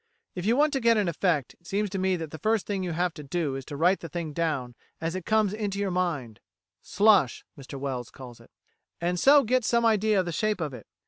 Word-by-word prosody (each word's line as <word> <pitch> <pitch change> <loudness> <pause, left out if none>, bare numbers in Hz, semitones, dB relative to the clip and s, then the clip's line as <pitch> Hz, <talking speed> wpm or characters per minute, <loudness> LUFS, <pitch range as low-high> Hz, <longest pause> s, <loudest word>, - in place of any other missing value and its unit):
If 180 +2 -4
you 235 +3 +3
want 300 +1 +3
to 270 - +1
get 230 -2 +4
an 205 -3 +1
effect, 165 -5 0
it 170 - -20
seems 205 +2 0
to 195 - -3
me 190 0 +1
that 160 -3 -6
the 160 - -8
first 220 +3 +1
thing 200 -2 -2
you 175 -2 -3
have 175 +1 0
to 150 - -9
do 145 -1 -2
is 135 - -5
to 145 - -7
write 180 +5 +3
the 165 - -8
thing 160 -1 -5
down 145 -7 -2 0.3
as 165 +1 -2
it 185 -2 -6
comes 215 -2 +2
into 205 -2 -3
your 200 -1 -1
mind" 155 - -2 0.4
("slush," 200 - +3
Mr 140 -1 -9
Wells 130 -3 -4
calls 125 -3 -12
it), - - -18 0.5
"and 175 +1 -1
so 280 +5 +6
get 250 +2 +1
some 235 +1 +2
idea 215 -2 +3
of 185 - 0
the 175 - -3
shape 215 +4 -1
of 150 -5 -3
it. - - -11
180 Hz, 250 wpm, -27 LUFS, 150-210 Hz, 0.5 s, so